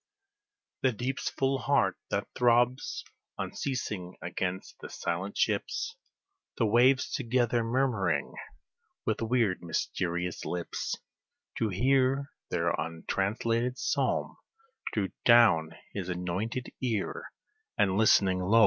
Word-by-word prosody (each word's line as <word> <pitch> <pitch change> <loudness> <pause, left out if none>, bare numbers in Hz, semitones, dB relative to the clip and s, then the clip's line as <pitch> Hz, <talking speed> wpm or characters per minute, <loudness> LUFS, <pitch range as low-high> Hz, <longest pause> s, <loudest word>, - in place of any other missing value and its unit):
The 130 -2 +3
deep's 130 +4 -2
full 135 0 0
heart 125 -9 +2
that - - -1
throbs 120 +1 +2 0.3
unceasing 105 -9 -3
against 90 +1 -4
the - - -8
silent 90 +4 -3
ships, 455 - 0 0.6
The 115 - +3
waves 125 +4 +4
together 120 -2 +1
murmuring 120 -4 0 0.7
with - - 0
weird, 115 -5 +1
mysterious 85 +1 -2
lips 90 -1 -3 0.6
To 110 - +1
hear 135 +6 +2 0.2
their 85 -1 +1
untranslated 105 - -1
psalm, - - 0 0.5
drew 100 -3 0
down 110 -10 +6 0.2
his 95 -3 -4
anointed 95 +8 -3
ear, 115 -6 -1 0.5
And 95 -1 +3
listening, 100 -3 +4
lo! 100 +5 +4
110 Hz, 105 wpm, -30 LUFS, 90-125 Hz, 0.7 s, down